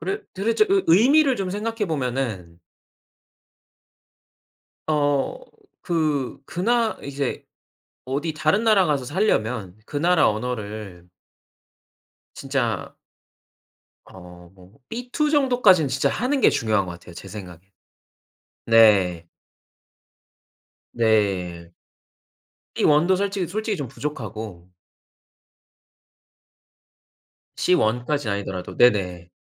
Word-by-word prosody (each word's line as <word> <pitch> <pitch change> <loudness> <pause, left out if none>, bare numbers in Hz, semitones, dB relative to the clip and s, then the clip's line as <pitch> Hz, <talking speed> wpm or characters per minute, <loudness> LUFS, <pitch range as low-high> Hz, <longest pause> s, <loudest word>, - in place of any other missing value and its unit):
그래 185 +4 -3
도대체 225 - +2
의 390 0 +3
의미를 265 - +5
좀 190 -2 -3
생각해 215 +1 -3
보면은 120 - -3 2.3
어 145 - 0 0.4
그 155 -6 -1
그 175 - -5
나 230 +1 +1
이제 140 -1 -4 0.6
어디 145 +5 -2
다른 155 +7 +1
나라 215 -5 +4
가서 140 -4 0
살려면 120 - -1
그 - - -11
나라 170 +1 +3
언어를 105 -5 -5 1.3
진짜 - - -2 1.1
어 90 -1 -14
뭐 95 +6 -19
B 245 +2 -7
2 300 -1 +1
정도까진 245 - +4
진짜 130 +1 0
하는 265 +4 -1
게 - - +6
중요한 110 -4 0
것 90 - -6
같아요, 85 0 -13
제 95 - -10
생각엔. 95 -5 -9 1.1
네. 100 -7 +4 1.7
네. 95 -7 0 1.0
B - - -1
1 150 +2 +4
도 190 - +4
솔직히 195 -1 -1
솔직히 215 +1 -3
좀 140 -5 -4
부족하고 110 -10 -7 2.9
C 180 - +2
1 120 -3 0
까진 145 -5 -1
아니더라도 95 -2 -5
네네. 90 -7 +2
135 Hz, 180 characters per minute, -23 LUFS, -, 2.9 s, 게